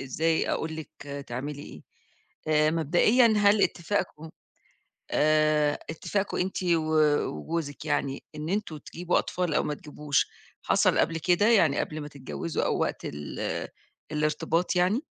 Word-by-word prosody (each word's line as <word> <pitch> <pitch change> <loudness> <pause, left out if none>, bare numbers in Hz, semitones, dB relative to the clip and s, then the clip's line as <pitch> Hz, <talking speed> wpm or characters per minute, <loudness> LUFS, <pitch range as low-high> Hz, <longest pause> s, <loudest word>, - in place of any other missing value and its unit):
إ - - -5
إزاي 160 +5 0
أقول 160 0 -2
لِك 160 - -7 0.4
تعملي 140 +4 -5
إيه. - - -11 0.7
آآ 155 0 +4
مبدئيًا 175 - +4
هل 205 0 +4
اتفاقكم 170 -3 -1 0.8
آآ 155 -1 +3
اتفاقكم 195 +5 -2
أنتِ 185 +1 -2
و 165 -3 +1 0.4
وجوزك 145 - -4
يعني 140 -2 -1
إن 150 +2 -5
أنتم 200 -5 -2
تجيبوا 175 +4 -2
أطفال 180 -4 -2
أو - - +2
ما 150 - -2
تجيبوش 145 -1 -1 0.4
حصل - - +3
قبل 165 - +2
كده 180 +6 +3
يعني 170 -11 +4
قبل 155 0 -3
ما 145 - -6
تتجوزوا 145 +3 -4
أو - - 0
وقت - - -2
ال 75 -1 -4 0.4
الإرتباط 155 +4 0
يعني؟ 200 - +2
155 Hz, 140 wpm, -27 LUFS, 150-180 Hz, 0.8 s, آآ